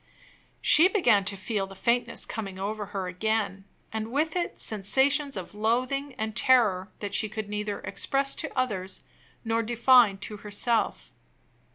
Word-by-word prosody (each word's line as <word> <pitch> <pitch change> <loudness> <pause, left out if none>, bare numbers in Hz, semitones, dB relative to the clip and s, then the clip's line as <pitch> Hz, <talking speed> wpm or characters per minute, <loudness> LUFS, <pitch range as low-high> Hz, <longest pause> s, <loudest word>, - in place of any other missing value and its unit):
She 325 +4 +7
began 240 - +3
to 200 0 -2
feel 195 0 -2
the 195 - -12
faintness 235 +5 0
coming 195 -4 -6
over 205 +2 -4
her 195 -2 -4
again, 200 +1 -2 0.3
and 220 +1 -3
with 310 +5 0
it 350 -1 -2
sensations 270 +7 0
of 185 0 -7
loathing 255 +6 -1
and 220 0 -3
terror 215 -8 +3
that 205 -1 -4
she 215 - +2
could 215 0 -5
neither 210 -1 -3
express 275 0 0
to - - -3
others 195 -7 -2 0.4
nor 225 0 +1
define 235 -2 +4
to 210 +2 -6
herself. 210 +3 -1
220 Hz, 150 wpm, -27 LUFS, 200-250 Hz, 0.4 s, She